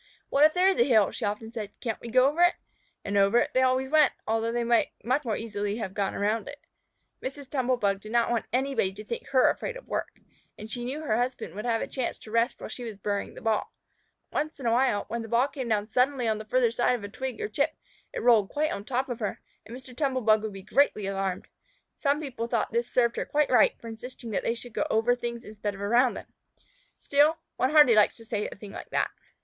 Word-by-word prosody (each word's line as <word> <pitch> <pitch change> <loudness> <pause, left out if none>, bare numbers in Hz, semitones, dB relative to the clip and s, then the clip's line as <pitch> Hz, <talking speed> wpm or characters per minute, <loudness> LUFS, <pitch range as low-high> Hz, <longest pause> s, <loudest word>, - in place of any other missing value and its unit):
"What 280 - +3
if 310 - +4
there 365 +1 +4
is 385 - +2
a - - +7
hill?" 220 -6 +4
she - - -4
often 210 +2 -3
said. 215 -3 -7
"Can't 225 -4 -3
we 235 - -7
go 255 +3 +5
over 300 +5 0
it?" 350 0 +5 0.5
And 200 0 -1
over 200 +4 +4
it - - +2
they 260 - +3
always 260 +1 +1
went, 310 -1 +5
although 225 +1 0
they 240 0 0
might 235 0 +3 0.2
much 255 +5 +1
more 225 -4 -1
easily 205 -2 -3
have 195 -5 -4
gone 200 -1 -1
around 210 +2 0
it. 290 0 -9 0.6
Mrs. 275 +1 -6
Tumble 255 -2 0
bug 200 -3 0
did 215 - -10
not 235 0 +2
want 235 -2 -1
anybody 260 -6 +1
to 210 +2 -9
think 235 - -5
her 260 -2 +4
afraid - - -5
of - - -14
work, - - -4 0.4
and 215 +1 -9
she 240 +1 -4
knew 270 +5 -4
her 220 -7 +1
husband 245 -8 -2
would 210 +4 -6
have 230 -1 +1
a - - -4
chance 255 -3 -3
to 215 - -13
rest 230 +2 +1
while - - -6
she 250 - -7
was 225 -4 -6
burying 200 0 -3
the - - -10
ball. 220 -2 0 0.6
Once 305 0 -2
in 265 - -7
a 230 - +3
while, 240 -3 +2
when 235 0 -3
the 225 - -7
ball 235 +4 +3
came 265 -4 -5
down 210 -1 +1
suddenly 250 +2 +1
on 215 -1 0
the 215 - -8
farther 240 +1 +2
side 245 +1 +2
of 230 - -7
a - - -4
twig 260 +5 -5
or 435 - -2
chip, - - 0 0.4
it - - -5
rolled 225 -5 +5
quite 305 +1 0
on 200 - -4
top 260 +4 -1
of 245 -3 -5
her, 210 -4 -3 0.3
and 235 +2 -8
Mr. 255 -1 -13
Tumble 265 -2 0
bug 215 -1 +4
would 220 -1 -4
be 195 -1 -9
greatly 215 -3 +2
alarmed. 195 -1 -2 0.5
Some 285 0 +1
people 255 -6 -4
thought 235 -2 -1
this 235 +1 -1
served 235 -2 +2
her - - -1
quite 295 -2 +1
right 250 - +4
for 230 - -10
insisting 230 +1 -8
that - - 0
they 230 - -1
should 240 0 -10
go - - -1
over 225 +3 +3
things 235 -1 -5
instead 210 -1 -4
of 195 - -10
around 240 +5 +3
them. - - -7 0.7
Still, 295 +3 +3 0.2
one 255 - +2
hardly 295 -5 +7
likes 210 -1 +4
to 230 - -13
say 215 -2 -2
a - - -8
thing 200 0 -10
like - - -9
that. - - 0
235 Hz, 255 wpm, -27 LUFS, 215-260 Hz, 0.7 s, a